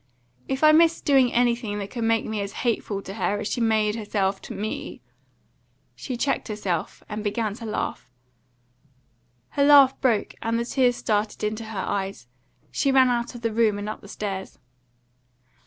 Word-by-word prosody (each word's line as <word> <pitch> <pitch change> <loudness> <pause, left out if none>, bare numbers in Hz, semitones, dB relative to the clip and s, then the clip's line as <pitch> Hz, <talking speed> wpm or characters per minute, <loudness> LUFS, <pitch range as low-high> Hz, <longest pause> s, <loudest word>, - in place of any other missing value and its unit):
"If 265 +2 -2
I 310 - +8
missed 330 +1 +4
doing 265 -4 +4
anything 235 -3 +1
that 200 -1 -5
could 235 -2 -4
make 225 0 +2
me 215 -1 -3
as 200 0 -5
hateful 210 -4 -1
to 195 - -7
her 205 -1 -1
as - - -3
she 240 - -2
made 215 -2 +2
herself 200 -3 -1
to - - -8
me 215 +2 -5 0.5
" - - -42
She 255 -3 -5
checked 275 +3 -1
herself, 195 -6 -3
and 210 0 -5
began 215 0 -1
to 230 +2 -9
laugh. 210 - -4 1.4
Her 280 - +1
laugh 280 -2 +6
broke, 235 -6 +1
and 230 0 0
the 235 - -1
tears 245 -1 +2
started 215 -2 -1
into 215 +1 -2
her 220 -2 -7
eyes; 195 -7 -3 0.5
she 275 - +1
ran 260 -1 +5
out 240 0 -1
of 240 - -8
the 230 -1 -1
room, 220 -2 +2
and 205 +1 -5
up 215 - -5
the - - -13
stairs. 195 -2 -5
220 Hz, 180 wpm, -24 LUFS, 205-245 Hz, 1.4 s, I